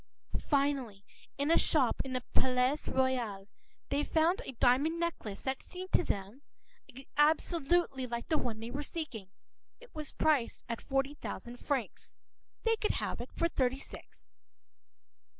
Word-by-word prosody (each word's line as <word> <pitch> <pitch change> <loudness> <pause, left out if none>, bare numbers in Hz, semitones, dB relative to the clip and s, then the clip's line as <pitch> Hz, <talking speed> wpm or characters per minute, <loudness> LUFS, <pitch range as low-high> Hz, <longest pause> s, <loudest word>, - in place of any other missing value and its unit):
p> 275 -8 +1 0.4
In 285 +3 +1
a - - +6
shop 270 -7 +3
in 265 - -5
the 255 -1 -1
Palais 255 +1 +3 0.2
Royal, 240 -7 0 0.4
they 285 +1 +1
found 325 +5 +2
a 270 - -6
diamond 275 +8 +3
necklace 325 -12 -3
that 265 0 -1
seemed 370 0 -8
to - - +4
them 205 - -3 0.8
absolutely 300 -2 +3
like 235 0 -4
the 310 -2 +2
one 230 -3 -2
they 230 +1 -5
were 280 +3 -3
seeking. 275 - -5 0.5
It - - -16
was 305 -3 -5
priced 290 -7 +1 0.2
forty 270 +1 0
thousand 245 -4 -6
francs. 270 -6 -3 0.5
They 455 -1 +3
could 430 - +1
have - - -2
it - - -7
for 335 - +2
thirty 260 -5 +1
six. - - -13
270 Hz, 145 wpm, -33 LUFS, 245-315 Hz, 0.8 s, a